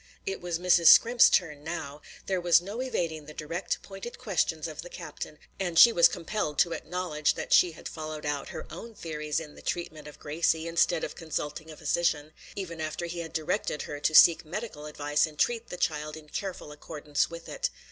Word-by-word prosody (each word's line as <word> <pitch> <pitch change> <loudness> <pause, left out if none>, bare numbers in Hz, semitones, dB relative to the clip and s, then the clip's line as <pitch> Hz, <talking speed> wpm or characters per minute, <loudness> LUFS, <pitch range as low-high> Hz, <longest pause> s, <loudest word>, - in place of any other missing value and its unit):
It 195 - -3
was 175 -1 -2
Mrs. 175 -1 +4
Scrimp's 240 +1 +8
turn 150 -5 +1
now; 150 -3 -5 0.2
there 190 -2 -1
was 175 -1 +6
no 200 +7 -5
evading 165 - -3
the 150 - -10
direct, 165 +5 -3
pointed 195 +5 -8
questions 165 -8 -1
of 155 -1 -7
the 175 - -10
captain, 155 -3 -8 0.2
and 175 -3 -2
she 235 +6 +9
was 170 -3 +7
compelled 165 -4 -3
to 170 - +3
acknowledge 170 -4 -1
that - - -2
she 175 -2 +5
had - - -9
followed 155 -1 -6
out 145 -1 -2
her - - -7
own 230 -1 -9
theories 150 -4 -3
in 150 -2 -9
the - - -14
treatment 155 -3 -4
of 150 - -11
Gracie, 160 +2 0
instead 165 0 +2
of - - -3
consulting 160 -1 -5
a 155 - -10
physician, 155 -3 0 0.2
even 170 -5 -5
after 155 +2 -3
he 170 0 -5
had 165 -2 -6
directed 155 -1 -2
her 145 - -6
to 155 +2 +1
seek 170 +1 +8
medical 160 -3 -6
advice 150 0 +1
and 155 -1 -13
treat 235 +4 +1
the 180 - -6
child 155 -3 -2
in 155 -1 -13
careful 185 -5 -5
accordance 150 -1 -2
with 170 0 -9
it. - - -2
165 Hz, 200 wpm, -28 LUFS, 150-180 Hz, 0.2 s, she